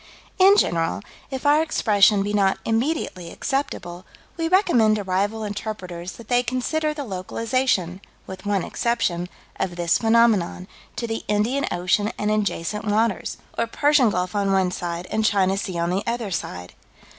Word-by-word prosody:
In 390 +2 +7
general, 165 - +1 0.3
if 265 -1 -5
our 295 +2 +5
expression 210 -9 +3
be 205 +1 -3
not 195 -2 +2
immediately 225 - -1
acceptable, 185 -9 -3 0.3
we 330 -1 -1
recommend 325 - +4
to 210 - -3
rival 200 +4 -1
interpreters 190 -4 -5
that 235 - -13
they 245 0 +3
consider 255 +6 -1
the 300 -1 -5
localization 195 -2 -1 0.2
with 190 0 -9
one 205 -3 0
exception 190 -7 -1 0.3
of 185 -2 -2
this 175 -1 +1
phenomenon, 225 -6 +2 0.3
to 235 - -3
the 225 -1 -4
Indian 230 +7 +1
Ocean 195 +4 +1
and 210 0 0
adjacent 210 -1 -1
waters, 215 0 0 0.2
or 230 - 0
Persian 285 0 +3
Gulf 180 -2 -2
on 200 -1 +1
one 190 -2 +2
side 175 -1 -4
and 220 - 0
China 195 -3 +2
Sea 195 -3 -4
on 170 +1 0
the 190 +2 0
other 230 -3 -2
side. 90 - -5
210 Hz, 155 wpm, -23 LUFS, 185-235 Hz, 0.3 s, In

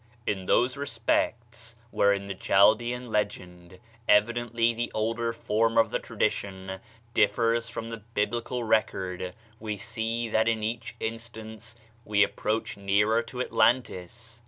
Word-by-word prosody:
In 95 -2 -2
those 125 +3 +3
respects 120 -5 -2 0.2
wherein 100 -1 +2
the 100 - -3
Chaldean 115 +6 +3
legend, 90 -4 -3 0.3
evidently 115 +2 +3
the 120 +1 -3
older 115 +2 0
form 115 0 0
of 115 -1 +4
the - - 0
tradition, 95 -1 -2 0.3
differs 115 -1 +2
from 115 -2 -5
the 115 - -4
Biblical 115 +3 -2
record, 95 -5 0 0.2
we 105 -1 -4
see 115 +2 -2
that 110 +1 +2
in 110 -1 +1
each 115 +1 -3
instance 110 0 -6 0.3
we 105 -2 +3
approach 110 +1 -2
nearer 105 +3 +2
to 125 +2 -6
Atlantis. 115 -1 0
110 Hz, 125 wpm, -27 LUFS, 105-115 Hz, 0.3 s, of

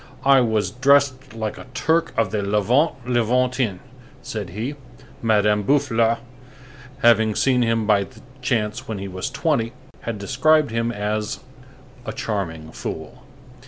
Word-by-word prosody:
"I 135 -1 +7
was 110 -5 0
dressed 135 0 +2
like 110 -1 -4
a - - -11
Turk 160 +5 +1
of 110 -4 +1
the 105 - -1
Levant 105 - +2
Levantin," 125 -2 +1 0.5
said 105 -5 -5
he. 110 +10 -4 0.5
Madame 105 -2 +3
de 100 - -9
Boufflers, 115 -5 +3 0.9
having 110 -2 +5
seen 130 -2 +2
him 115 -2 +1
by 100 -2 +3 0.3
chance 110 -4 -1
when 110 - -4
he 100 0 -5
was 95 -1 -4
twenty, 125 -8 0 0.3
had 115 -2 -4
described 145 +7 +2
him 115 +1 0
as 105 0 -2 0.6
"a - - -5
charming 80 -7 -4
fool." - - -7
115 Hz, 135 wpm, -22 LUFS, 105-125 Hz, 0.9 s, I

